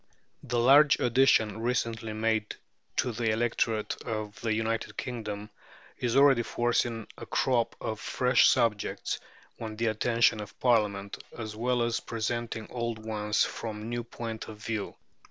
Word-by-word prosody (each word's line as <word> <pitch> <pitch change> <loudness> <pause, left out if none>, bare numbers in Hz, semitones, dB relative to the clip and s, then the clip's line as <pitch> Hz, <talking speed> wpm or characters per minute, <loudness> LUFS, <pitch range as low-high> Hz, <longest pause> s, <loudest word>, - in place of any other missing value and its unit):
The 120 - -2
large 140 +5 +6
addition 120 -4 +3
recently 115 -2 -1
made 110 -1 0 0.4
to 125 - +1
the 115 0 -1
electorate 115 -1 0
of 110 -2 -5
the 115 - -1
United 115 +1 -1
Kingdom 105 -4 -5 0.5
is 120 -2 0
already 135 -3 +6
forcing 120 -1 0
a - - -8
crop 120 -3 +1
of 110 -1 -4
fresh 125 0 +3
subjects 115 -5 0 0.4
on 110 -1 -5
the 115 +2 -1
attention 115 +1 +2
of 105 - -10
Parliament, 105 -5 +1
as 110 -2 -5
well 120 +2 +1
as 115 0 0
presenting 115 0 -3
old 120 -2 -2
ones 105 -1 +1
from 110 -1 -4
new 120 0 -2
points 115 -1 -6
of 110 - -9
view. 110 -1 -4
115 Hz, 140 wpm, -29 LUFS, 110-120 Hz, 0.5 s, large